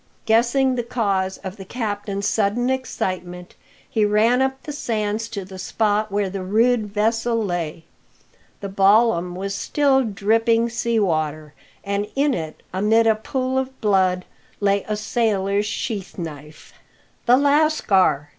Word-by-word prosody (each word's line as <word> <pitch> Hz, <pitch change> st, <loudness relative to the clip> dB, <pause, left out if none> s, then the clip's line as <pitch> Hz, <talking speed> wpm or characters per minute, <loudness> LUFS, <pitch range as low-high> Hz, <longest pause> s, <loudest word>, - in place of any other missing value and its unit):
Guessing 240 Hz, +4 st, +3 dB
the 245 Hz, -, -1 dB
cause 200 Hz, -6 st, -1 dB
of 190 Hz, +1 st, -6 dB
the 195 Hz, -, -8 dB
captain's 205 Hz, -2 st, -3 dB
sudden 225 Hz, +4 st, +1 dB
excitement, 185 Hz, -8 st, -4 dB, 0.3 s
he 220 Hz, -, 0 dB
ran 215 Hz, +5 st, +3 dB
up 265 Hz, 0 st, -1 dB
the 300 Hz, -, -6 dB
sands 220 Hz, -4 st, -2 dB
to 200 Hz, -4 st, -5 dB
the 190 Hz, 0 st, -10 dB
spot 210 Hz, +2 st, 0 dB
where 200 Hz, 0 st, 0 dB
the 190 Hz, 0 st, -5 dB
rude 220 Hz, +3 st, +2 dB
vessel 225 Hz, +3 st, 0 dB
lay. 175 Hz, -6 st, -3 dB, 0.8 s
The 200 Hz, -, -4 dB
ballam 195 Hz, -2 st, +3 dB
was 195 Hz, +2 st, -4 dB
still 270 Hz, +5 st, +2 dB
dripping 225 Hz, +2 st, +1 dB
sea 235 Hz, -1 st, 0 dB
water; 155 Hz, -5 st, -1 dB, 0.3 s
and 200 Hz, +1 st, -2 dB
in 280 Hz, +1 st, +2 dB
it, 160 Hz, -5 st, -5 dB
amid 215 Hz, +4 st, +3 dB
a 225 Hz, -, +5 dB
pool 260 Hz, +4 st, -2 dB
of 265 Hz, 0 st, -5 dB
blood, 185 Hz, -4 st, +2 dB, 0.3 s
lay 200 Hz, -1 st, +1 dB
a 210 Hz, 0 st, -1 dB
sailors 210 Hz, -2 st, 0 dB
sheath 205 Hz, -2 st, -4 dB
knife. 150 Hz, -3 st, -9 dB, 0.5 s
"The 245 Hz, +1 st, +6 dB
lascar!" 280 Hz, -, +2 dB
210 Hz, 140 wpm, -22 LUFS, 190-235 Hz, 0.8 s, The